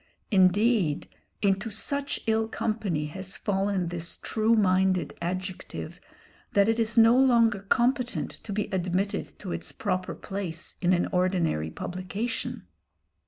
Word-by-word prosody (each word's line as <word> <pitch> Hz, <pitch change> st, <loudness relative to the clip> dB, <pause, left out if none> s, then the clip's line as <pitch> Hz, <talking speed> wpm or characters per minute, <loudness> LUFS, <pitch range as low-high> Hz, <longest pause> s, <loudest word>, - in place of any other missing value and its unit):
Indeed 195 Hz, -3 st, +3 dB, 0.4 s
into 195 Hz, +2 st, +2 dB
such 280 Hz, +6 st, -1 dB
ill 220 Hz, -1 st, +2 dB
company 210 Hz, -9 st, -1 dB
has 190 Hz, +4 st, -4 dB
fallen 195 Hz, -3 st, 0 dB
this 170 Hz, -1 st, -5 dB
true 220 Hz, +1 st, +1 dB
minded 190 Hz, -3 st, +2 dB
adjective, 185 Hz, +2 st, -5 dB, 0.5 s
that 200 Hz, 0 st, +4 dB
it 225 Hz, +1 st, +2 dB
is 225 Hz, 0 st, 0 dB
no 230 Hz, +1 st, +7 dB
longer 235 Hz, -5 st, +4 dB
competent 250 Hz, 0 st, +1 dB
to 215 Hz, -, -9 dB
be 210 Hz, +1 st, 0 dB
admitted 185 Hz, +2 st, -1 dB
to 185 Hz, -, -7 dB
its -, -, -3 dB
proper 185 Hz, -3 st, -2 dB
place 185 Hz, -4 st, -4 dB
in 180 Hz, 0 st, +3 dB
an 175 Hz, -, +2 dB
ordinary 180 Hz, -, +1 dB
publication. 185 Hz, -, -4 dB
195 Hz, 125 wpm, -27 LUFS, 185-225 Hz, 0.5 s, no